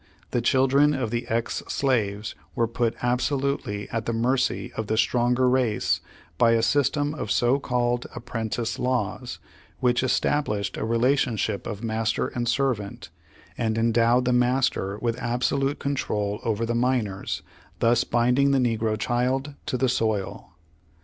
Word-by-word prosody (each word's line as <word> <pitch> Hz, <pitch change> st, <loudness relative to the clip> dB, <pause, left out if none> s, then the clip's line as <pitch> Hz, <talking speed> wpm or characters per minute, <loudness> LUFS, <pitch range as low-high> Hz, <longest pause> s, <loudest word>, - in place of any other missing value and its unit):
The 120 Hz, -, +1 dB
child 130 Hz, +2 st, +2 dB
ren 145 Hz, +1 st, +5 dB
of 125 Hz, -5 st, -2 dB
the 120 Hz, 0 st, -2 dB
ex 115 Hz, +1 st, -1 dB
slaves 110 Hz, -6 st, 0 dB, 0.2 s
were 115 Hz, -, +2 dB
put 115 Hz, 0 st, -1 dB
absolutely 125 Hz, -4 st, -1 dB
at 115 Hz, -1 st, -3 dB
the 115 Hz, -, 0 dB
mercy 125 Hz, +3 st, 0 dB
of 110 Hz, -1 st, -3 dB
the 110 Hz, -, 0 dB
stronger 125 Hz, +2 st, +2 dB
race 125 Hz, -4 st, +1 dB, 0.4 s
by 115 Hz, -1 st, +5 dB
a 115 Hz, -1 st, +2 dB
system 145 Hz, +3 st, +1 dB
of 145 Hz, -8 st, -5 dB
so 120 Hz, +6 st, +3 dB
called 120 Hz, -2 st, 0 dB
apprentice 115 Hz, 0 st, -3 dB
law^s 125 Hz, -2 st, -2 dB, 0.4 s
which 125 Hz, -1 st, +2 dB
established 105 Hz, -6 st, 0 dB
a -, -, -3 dB
relationship 115 Hz, -3 st, +1 dB
of 110 Hz, -1 st, -6 dB
master 110 Hz, -1 st, 0 dB
and 120 Hz, -1 st, -2 dB
servant, 120 Hz, -6 st, -1 dB, 0.5 s
and 110 Hz, -2 st, 0 dB
endowed 115 Hz, +2 st, +3 dB
the 125 Hz, -, +2 dB
master 125 Hz, -5 st, +1 dB
with 120 Hz, +1 st, -1 dB
absolute 135 Hz, +4 st, 0 dB
control 105 Hz, -7 st, -2 dB
over 115 Hz, 0 st, 0 dB
the 120 Hz, -, -1 dB
minors, 120 Hz, -5 st, -1 dB, 0.3 s
thus 120 Hz, +1 st, +3 dB
bind 125 Hz, +2 st, +2 dB
ing 140 Hz, 0 st, +4 dB
the 140 Hz, -, +3 dB
negro 115 Hz, -3 st, +1 dB
childien 130 Hz, +5 st, -1 dB
to 125 Hz, -, 0 dB
the 130 Hz, -, +2 dB
soil. 110 Hz, -5 st, -2 dB
120 Hz, 150 wpm, -25 LUFS, 110-130 Hz, 0.5 s, ren